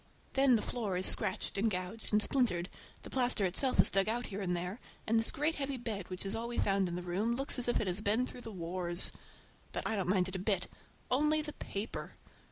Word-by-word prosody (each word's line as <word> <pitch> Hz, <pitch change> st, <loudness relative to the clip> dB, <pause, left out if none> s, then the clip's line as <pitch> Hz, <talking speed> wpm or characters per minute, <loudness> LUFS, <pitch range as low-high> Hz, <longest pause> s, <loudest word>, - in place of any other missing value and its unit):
Then 270 Hz, -2 st, +5 dB
the 220 Hz, -, 0 dB
floor 210 Hz, -7 st, -1 dB
is 185 Hz, -, +1 dB
scratched -, -, +2 dB
and 225 Hz, +3 st, +2 dB
gouged 185 Hz, +3 st, -4 dB
and 210 Hz, 0 st, +6 dB
splintered, 195 Hz, -10 st, +2 dB, 0.3 s
the -, -, -10 dB
plaster 245 Hz, -5 st, +2 dB
itself 250 Hz, +9 st, +2 dB
is -, -, +7 dB
dug 195 Hz, +2 st, +3 dB
out 240 Hz, +2 st, -1 dB
here 200 Hz, -1 st, -5 dB
and 180 Hz, -2 st, -1 dB
there, 180 Hz, +6 st, -4 dB, 0.3 s
and 225 Hz, +1 st, +3 dB
this 225 Hz, -, +3 dB
great 300 Hz, +3 st, 0 dB
heavy 275 Hz, -2 st, -3 dB
bed, 215 Hz, -6 st, -4 dB
which 185 Hz, +1 st, -5 dB
is 195 Hz, -, -2 dB
all 230 Hz, +1 st, -3 dB
we 240 Hz, -, -5 dB
found 195 Hz, -2 st, +2 dB
in 175 Hz, -, -4 dB
the 180 Hz, -, -4 dB
room, 200 Hz, +7 st, -1 dB
looks 275 Hz, 0 st, -2 dB
as 245 Hz, -, -1 dB
if 240 Hz, -, +2 dB
it -, -, -1 dB
had 185 Hz, +3 st, -1 dB
been 220 Hz, +5 st, +2 dB
through 250 Hz, -, -9 dB
the 225 Hz, -, -8 dB
wars. 175 Hz, -1 st, 0 dB, 0.6 s
But -, -, -4 dB
I 220 Hz, -, 0 dB
don't 190 Hz, -3 st, -1 dB
mind 185 Hz, -2 st, +3 dB
it 185 Hz, -, -6 dB
a -, -, -2 dB
bit—only 270 Hz, +9 st, -1 dB
the 300 Hz, 0 st, -6 dB
paper. 200 Hz, +3 st, -6 dB
210 Hz, 235 wpm, -33 LUFS, 185-245 Hz, 0.6 s, is